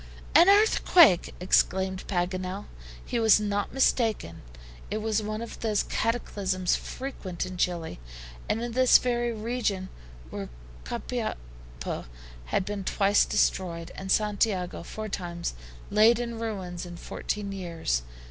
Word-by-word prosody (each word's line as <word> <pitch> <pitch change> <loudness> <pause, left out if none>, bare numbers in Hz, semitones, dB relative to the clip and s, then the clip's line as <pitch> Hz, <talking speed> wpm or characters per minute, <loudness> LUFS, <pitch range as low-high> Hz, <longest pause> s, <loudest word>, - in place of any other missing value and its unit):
"An 350 - +8
earthquake!" 365 - +5
exclaimed 190 +1 +1
Paganel. 185 +1 -2 0.4
He - - -1
was 220 -2 +6
not 205 -1 -1
mistaken. 225 - +1 0.5
It 210 - -2
was 220 0 0
one 215 +1 -4
of 235 - -9
those 215 -3 +1
cataclysms 195 -6 0
frequent 195 -11 -5
in 185 0 -7
Chili, 175 - -2 0.5
and 225 - 0
in 240 - -3
this 255 +1 +6
very 240 -1 0
region 215 -4 -2 0.4
where - - -5 0.4
Copiapo - - -5 0.4
had 185 - 0
been 205 -1 -4
twice 200 +2 +3
destroyed, 170 -3 0
and 190 0 -5
Santiago 205 -3 +1
four 215 +5 -6
times 175 -4 -4 0.4
laid 215 +3 +6
in 235 -1 -4
ruins 190 -6 -4
in 175 -1 -8
fourteen 205 +3 -4
years. 170 - -2
200 Hz, 125 wpm, -27 LUFS, 180-225 Hz, 0.5 s, An